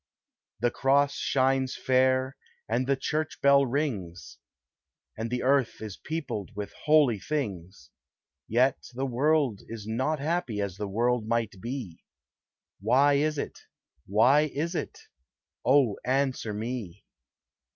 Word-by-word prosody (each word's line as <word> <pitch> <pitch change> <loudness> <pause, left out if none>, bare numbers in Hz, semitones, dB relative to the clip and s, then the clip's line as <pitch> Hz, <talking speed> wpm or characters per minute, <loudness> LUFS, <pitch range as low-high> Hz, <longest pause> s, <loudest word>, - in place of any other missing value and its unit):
The 120 0 +2
cross 140 +2 +2
shines 135 -1 +1
fair, 130 +1 +2 0.3
and 130 - 0
the 140 - +3
church 155 +3 -3
bell 140 -1 +5
rings, 115 - -3 0.8
And 115 +1 -4
the 125 +1 -2
earth 135 -2 +2
is 105 -3 -6
peopled 145 -10 -5
with 105 0 -5
holy 145 -8 +4
things; 100 - -5 0.6
Yet 125 +4 +2
the 135 +2 -1
world 135 -3 +1
is 115 -2 -7
not 130 +8 -1
happy, 150 -7 -2
as 100 -2 -3
the 105 - -3
world 115 +2 0
might 115 -5 -1
be, 115 -8 -6 0.8
Why 130 +8 +4
is 150 +2 +1
it? - - -5 0.5
why 130 +10 +4
is 165 +5 -2
it? 175 - -4 0.7
Oh, 130 -5 +4
answer 130 -3 0
me! 105 -3 -5
130 Hz, 125 wpm, -28 LUFS, 110-140 Hz, 0.8 s, bell